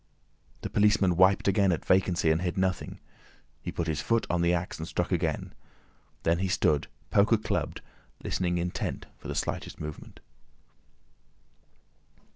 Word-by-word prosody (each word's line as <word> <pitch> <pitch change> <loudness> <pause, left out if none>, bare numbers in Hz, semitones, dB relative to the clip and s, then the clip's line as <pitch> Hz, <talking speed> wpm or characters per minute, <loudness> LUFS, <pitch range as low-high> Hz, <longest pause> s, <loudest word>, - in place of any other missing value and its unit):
The - - -4
policeman 105 -3 +3
wiped 95 +3 +4
again 100 -1 +4
at 85 - -2
vacancy 90 -3 +3
and 80 +2 +1
hit 90 0 -2
nothing; 95 0 -1 0.6
he - - -4
put 85 - -2
his 80 -3 -1
foot 115 -1 +1
on 90 -1 +1
the 85 0 +3
axe, 85 -1 -2
and 80 - -4
struck 90 +2 -2
again. 85 -4 -1 0.7
Then 85 +1 +2
he 95 - 0
stood, 75 -5 +2 0.2
poker 105 +3 +5
clubbed, 105 - -2 0.4
listening 90 -1 0
intent 85 +1 -3
for - - -9
the - - -4
slightest - - -3
movement. 75 -1 -8
90 Hz, 145 wpm, -28 LUFS, 85-95 Hz, 0.7 s, poker